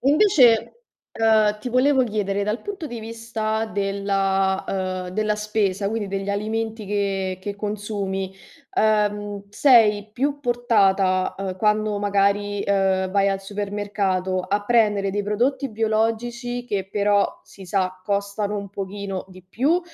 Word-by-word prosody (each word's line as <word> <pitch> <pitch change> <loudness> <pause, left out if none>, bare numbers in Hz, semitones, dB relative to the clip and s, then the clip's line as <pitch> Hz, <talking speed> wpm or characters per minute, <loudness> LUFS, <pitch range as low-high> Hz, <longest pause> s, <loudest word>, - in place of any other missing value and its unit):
E 275 - +3
invece, 290 - +5 0.4
ehm, 220 -2 +3
ti 230 +4 -5
volevo 260 +1 +4
chiedere, 205 -2 -1
dal 210 +4 -1
punto 400 -5 -6
di 240 -5 -6
vista 225 -1 -3
della 195 -1 0
uhm, 185 -1 -2
della 210 +3 0
spesa, 210 -2 0
quindi 220 -1 -2
degli 195 0 -3
alimenti 220 +2 -2
che 195 -2 -1
che 200 +1 -5
consumi, 200 -2 -3 0.4
ehm, 205 -1 +1
sei 210 -4 +4
più 285 +4 -1
portata, 200 -7 +2
uhm, 190 -1 -4
quando 210 0 +1
magari, 205 0 +1
uhm 190 -1 +2
,vai 200 0 +3
al 195 0 -1
supermercato, 200 -2 -2
a 205 +2 -1
prendere 210 -4 +3
dei 205 +1 -1
prodotti 245 +6 0
biologici 230 +3 -1
che 195 -5 -2
però, 205 -1 +1
si 195 - -14
sa, 185 0 -1
costano 200 0 -1
un 200 0 -5
pochino 195 -1 -5
di 185 0 -14
più, 270 - +1
205 Hz, 135 wpm, -23 LUFS, 195-220 Hz, 0.4 s, invece